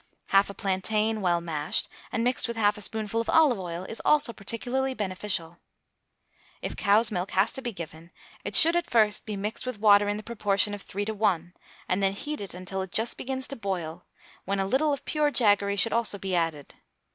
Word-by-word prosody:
Half 195 Hz, +1 st, +4 dB
a 200 Hz, -, -8 dB
plantain 215 Hz, +2 st, -1 dB
well 175 Hz, -2 st, +1 dB
mashed 155 Hz, -3 st, -1 dB, 0.2 s
and 230 Hz, -, -1 dB
mixed 250 Hz, +1 st, +1 dB
with 235 Hz, -1 st, -5 dB
half 205 Hz, -2 st, +3 dB
a 210 Hz, -, -9 dB
spoonful 220 Hz, +1 st, -1 dB
of 230 Hz, -, -5 dB
olive 295 Hz, -9 st, +4 dB
oil 175 Hz, -1 st, -5 dB
is 220 Hz, +4 st, -4 dB
also 295 Hz, -5 st, +3 dB
particularly 250 Hz, +6 st, -3 dB
beneficial. 185 Hz, -4 st, -3 dB, 1.0 s
If -, -, -5 dB
cow's 210 Hz, +3 st, +3 dB
milk 180 Hz, -1 st, -2 dB
has 200 Hz, +4 st, +4 dB
to 265 Hz, -, -5 dB
be 245 Hz, -, -3 dB
given, 170 Hz, -3 st, -9 dB, 0.3 s
it -, -, -2 dB
should 330 Hz, +2 st, +8 dB
at 345 Hz, -, 0 dB
first 215 Hz, -3 st, +2 dB
be 210 Hz, -2 st, -4 dB
mixed 210 Hz, +5 st, -4 dB
with 255 Hz, -5 st, -4 dB
water 205 Hz, -1 st, +5 dB
in 205 Hz, -, -1 dB
the 215 Hz, -, -7 dB
proportion 205 Hz, -3 st, +1 dB
of 205 Hz, -, -6 dB
three 205 Hz, +1 st, -4 dB
to 220 Hz, -, -3 dB
one, 180 Hz, -5 st, 0 dB, 0.3 s
and 185 Hz, +2 st, 0 dB
then 195 Hz, 0 st, +2 dB
heated 205 Hz, -4 st, -5 dB
until 185 Hz, +1 st, -4 dB
it 190 Hz, -1 st, -6 dB
just 225 Hz, +4 st, +1 dB
begins 265 Hz, 0 st, -4 dB
to 275 Hz, -, -5 dB
boil, 185 Hz, -8 st, -4 dB, 0.4 s
when 200 Hz, 0 st, -2 dB
a 195 Hz, -, +1 dB
little 270 Hz, +9 st, +1 dB
of 280 Hz, -, -4 dB
pure 300 Hz, -1 st, +1 dB
jaggery 205 Hz, -6 st, +3 dB
should 200 Hz, +3 st, +2 dB
also 230 Hz, -3 st, +1 dB
be 190 Hz, -1 st, -4 dB
added. 165 Hz, -4 st, -2 dB
205 Hz, 205 wpm, -27 LUFS, 190-230 Hz, 1.0 s, should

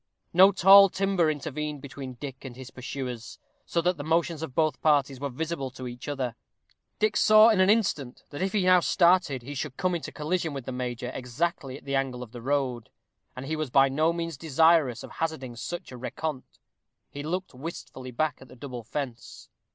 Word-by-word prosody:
No 190 Hz, +3 st, +8 dB
tall 195 Hz, +1 st, +8 dB
timber 190 Hz, -3 st, +1 dB
intervened 150 Hz, 0 st, -3 dB
between 135 Hz, -1 st, -8 dB
Dick 130 Hz, +1 st, -8 dB
and 130 Hz, -3 st, -8 dB
his 130 Hz, 0 st, -10 dB
pursuers, 125 Hz, -2 st, -6 dB, 0.3 s
so 170 Hz, -, 0 dB
that 180 Hz, 0 st, +1 dB
the 145 Hz, -, -5 dB
motions 165 Hz, 0 st, 0 dB
of 140 Hz, -6 st, -6 dB
both 155 Hz, -1 st, +1 dB
parties 140 Hz, -4 st, +2 dB
were 140 Hz, 0 st, -3 dB
visible 145 Hz, 0 st, -3 dB
to 130 Hz, 0 st, -8 dB
each 120 Hz, 0 st, -8 dB
other. 130 Hz, -5 st, -3 dB, 0.6 s
Dick 215 Hz, -1 st, +1 dB
saw 215 Hz, +1 st, +7 dB
in 215 Hz, -4 st, +3 dB
an 185 Hz, -, +4 dB
instant 190 Hz, -, +1 dB
that 145 Hz, -, -6 dB
if 190 Hz, 0 st, 0 dB
he 205 Hz, -2 st, +1 dB
now 185 Hz, 0 st, +6 dB
started 170 Hz, -7 st, +3 dB
he 140 Hz, +4 st, -7 dB
should 135 Hz, -1 st, -5 dB
come 185 Hz, -1 st, 0 dB
into 170 Hz, -, -4 dB
collision 160 Hz, 0 st, -2 dB
with 135 Hz, -3 st, -6 dB
the -, -, -4 dB
major 125 Hz, -1 st, -4 dB
exactly 135 Hz, +1 st, -3 dB
at -, -, -17 dB
the 140 Hz, -, -4 dB
angle 130 Hz, -2 st, -1 dB
of 115 Hz, -, -12 dB
the 120 Hz, -1 st, -9 dB
road, 130 Hz, -3 st, -1 dB, 0.5 s
and 130 Hz, +1 st, -7 dB
he 155 Hz, +3 st, -2 dB
was 155 Hz, -3 st, -3 dB
by 135 Hz, +2 st, +5 dB
no 155 Hz, +5 st, +2 dB
means 165 Hz, -3 st, -4 dB
desirous 160 Hz, -4 st, +3 dB
of -, -, -10 dB
hazarding 145 Hz, -7 st, -4 dB
such 175 Hz, +8 st, -6 dB
a 125 Hz, -, -8 dB
rencontre. 130 Hz, +2 st, -4 dB, 0.6 s
He 145 Hz, -, -6 dB
looked 180 Hz, +4 st, -3 dB
wistfully 130 Hz, -2 st, -8 dB
back 145 Hz, +4 st, -1 dB
at 130 Hz, -, -12 dB
the 125 Hz, -, -14 dB
double 125 Hz, -2 st, -7 dB
fence. 120 Hz, -2 st, -6 dB
145 Hz, 200 wpm, -27 LUFS, 130-170 Hz, 0.6 s, No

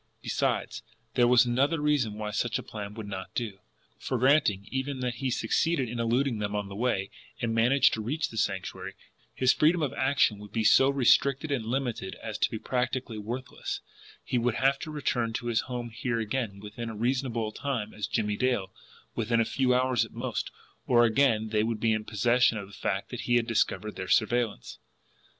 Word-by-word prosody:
Besides, -, -, -1 dB, 0.3 s
there 120 Hz, +1 st, +4 dB
was 125 Hz, 0 st, +6 dB
another 135 Hz, +7 st, +1 dB
reason 145 Hz, -8 st, +1 dB
why 105 Hz, 0 st, -4 dB
such 115 Hz, +2 st, 0 dB
a -, -, -6 dB
plan 105 Hz, -1 st, -7 dB
would 110 Hz, -2 st, -6 dB
not 95 Hz, -2 st, -7 dB
do; 105 Hz, -5 st, -3 dB, 0.4 s
for, 130 Hz, -, -2 dB
granting 130 Hz, -6 st, +3 dB
even 130 Hz, 0 st, -2 dB
that 125 Hz, -2 st, -2 dB
he 135 Hz, -, 0 dB
succeeded 130 Hz, +4 st, +1 dB
in 120 Hz, +1 st, -5 dB
eluding 120 Hz, +1 st, +1 dB
them 105 Hz, 0 st, -2 dB
on 105 Hz, -1 st, -2 dB
the 100 Hz, -, -8 dB
way, 105 Hz, -4 st, -1 dB, 0.3 s
and 115 Hz, -1 st, -1 dB
managed 120 Hz, +5 st, +4 dB
to 110 Hz, -, -2 dB
reach 150 Hz, +9 st, -2 dB
the 115 Hz, -, -9 dB
Sanctuary, 100 Hz, -3 st, -2 dB, 0.4 s
his 130 Hz, 0 st, +4 dB
freedom 160 Hz, +2 st, +3 dB
of 140 Hz, -, -1 dB
action 130 Hz, -6 st, +2 dB
would 105 Hz, 0 st, -11 dB
be 110 Hz, -, 0 dB
so 135 Hz, +5 st, +6 dB
restricted 140 Hz, +2 st, +3 dB
and 125 Hz, -6 st, -1 dB
limited 120 Hz, -6 st, -2 dB
as 110 Hz, -2 st, -6 dB
to -, -, +2 dB
be 110 Hz, -, -4 dB
practically 125 Hz, -1 st, -2 dB
worthless 120 Hz, +5 st, -5 dB, 0.4 s
he 125 Hz, -, 0 dB
would 120 Hz, -1 st, 0 dB
have 135 Hz, +1 st, +2 dB
to 160 Hz, -, -6 dB
return 125 Hz, -6 st, -1 dB
to 120 Hz, -, -4 dB
his 120 Hz, -1 st, +1 dB
home 120 Hz, -2 st, -4 dB
here 115 Hz, +1 st, -2 dB
again 110 Hz, -2 st, -2 dB
within 105 Hz, +3 st, -6 dB
a 110 Hz, -, -6 dB
reasonable 120 Hz, -1 st, -1 dB
time 115 Hz, -4 st, -3 dB
as 105 Hz, -2 st, -3 dB
Jimmie 105 Hz, -2 st, -1 dB
Dale, 120 Hz, -8 st, 0 dB, 0.4 s
within 115 Hz, +1 st, 0 dB
a 115 Hz, -, +3 dB
few 130 Hz, +1 st, +1 dB
hours 125 Hz, -2 st, +3 dB
at 115 Hz, -, -9 dB
most 115 Hz, -3 st, -3 dB, 0.4 s
or 120 Hz, -1 st, +5 dB
again 115 Hz, -2 st, +2 dB
they 105 Hz, -1 st, +2 dB
would 110 Hz, 0 st, -1 dB
be 110 Hz, 0 st, +2 dB
in 110 Hz, 0 st, -2 dB
possession 120 Hz, +2 st, +3 dB
of 100 Hz, -, -5 dB
the 100 Hz, -, -16 dB
fact 95 Hz, 0 st, -3 dB
that 125 Hz, -, -4 dB
he 120 Hz, -, +4 dB
had 120 Hz, -1 st, +3 dB
discovered 110 Hz, -1 st, 0 dB
their 95 Hz, -, -4 dB
surveillance. 115 Hz, -, 0 dB
120 Hz, 200 wpm, -28 LUFS, 110-130 Hz, 0.4 s, was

